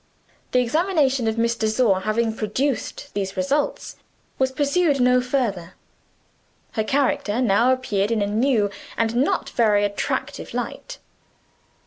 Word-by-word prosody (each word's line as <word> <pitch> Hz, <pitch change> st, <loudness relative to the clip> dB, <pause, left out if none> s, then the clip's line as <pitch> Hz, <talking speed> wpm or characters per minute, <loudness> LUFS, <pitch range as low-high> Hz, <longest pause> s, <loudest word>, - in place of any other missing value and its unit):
The -, -, +2 dB
examination 275 Hz, -2 st, +1 dB
of 220 Hz, 0 st, -1 dB
Miss 230 Hz, 0 st, +2 dB
de 220 Hz, -1 st, -1 dB
Sor 215 Hz, -3 st, +2 dB
having 220 Hz, +3 st, -1 dB
produced 265 Hz, +6 st, -3 dB
these 195 Hz, -1 st, -3 dB
results 280 Hz, +1 st, -1 dB, 0.4 s
was 260 Hz, 0 st, +2 dB
pursued 290 Hz, +1 st, +1 dB
no 250 Hz, 0 st, +4 dB
further. 225 Hz, -9 st, -2 dB, 1.0 s
Her 220 Hz, -, -1 dB
character 250 Hz, -3 st, 0 dB
now 240 Hz, +1 st, +3 dB
appeared 210 Hz, -6 st, 0 dB
in 225 Hz, -3 st, +1 dB
a -, -, +1 dB
new, 215 Hz, 0 st, +1 dB, 0.3 s
and 230 Hz, 0 st, 0 dB
not 260 Hz, +4 st, 0 dB
very 210 Hz, -3 st, +3 dB
attractive, 205 Hz, 0 st, -3 dB
light. -, -, -5 dB
235 Hz, 130 wpm, -22 LUFS, 215-270 Hz, 1.0 s, no